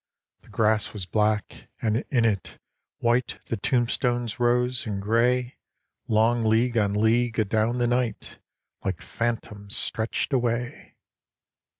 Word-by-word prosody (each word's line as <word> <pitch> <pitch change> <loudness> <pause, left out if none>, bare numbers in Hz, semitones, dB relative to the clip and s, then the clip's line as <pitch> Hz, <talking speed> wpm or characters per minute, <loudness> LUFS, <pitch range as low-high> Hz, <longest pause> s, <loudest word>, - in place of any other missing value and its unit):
The - - -22
grass 110 -1 +1
was 100 -4 -5
black, 105 +2 -1
and 110 -1 +1
in 120 -4 +2
it, 100 -4 -1 0.4
white 120 +2 +1
The - - -2
tombstones 120 +1 0
rose; 125 0 +2
and 100 -2 -2
gray, 120 +4 +1 0.5
Long 115 +2 +2
league 115 +3 +2
on 105 -3 +2
league, 115 +2 +2
adown 110 +3 +1
the 120 - +1
night, 120 -1 -2 0.4
Like 95 -3 -2
phantoms, 105 -3 -3
stretched 110 +5 -1
away. 120 -1 -2
115 Hz, 120 wpm, -25 LUFS, 110-120 Hz, 0.5 s, in